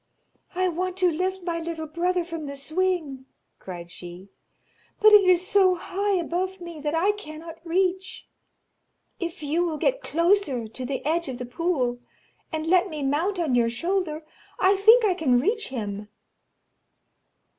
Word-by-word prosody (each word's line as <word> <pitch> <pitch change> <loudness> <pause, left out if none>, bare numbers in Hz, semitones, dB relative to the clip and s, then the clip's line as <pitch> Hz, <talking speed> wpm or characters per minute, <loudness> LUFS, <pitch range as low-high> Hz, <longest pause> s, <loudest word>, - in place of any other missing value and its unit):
'I 370 0 +2
want 365 +2 -3
to 365 -2 +3
lift 370 +3 -2
my 340 -1 -2
little 325 -1 -5
brother 350 +3 0
from 330 -3 -6
the 280 - -6
swing,' 310 -3 -2 0.3
cried 175 -2 -8
she, 175 +3 -10 0.7
'but 430 0 +7
it 410 -2 +8
is 365 0 +4
so 390 -3 +4
high 400 +3 -2
above 370 +2 -2
me, 340 -3 -8
that 295 +1 -2
I 370 +5 +3
cannot 330 -4 -10
reach. 370 +2 -1 0.9
If 340 -3 -5
you 315 +4 +1
will 330 -3 -2
get - - 0
closer 335 - +1
to 250 +4 -7
the 275 0 -4
edge 330 0 0
of 255 - -5
the 250 - -5
pool, 250 -3 -1 0.5
and 315 -1 -3
let 365 +3 +3
me 305 -3 -5
mount 320 +9 0
on 325 -7 0
your 235 -1 +3
shoulder, 320 +4 -2 0.3
I 385 +2 +4
think 440 +4 +6
I 390 - +3
can 290 -9 +2
reach 425 - 0
him.' 210 -5 -5
335 Hz, 160 wpm, -25 LUFS, 285-370 Hz, 0.9 s, it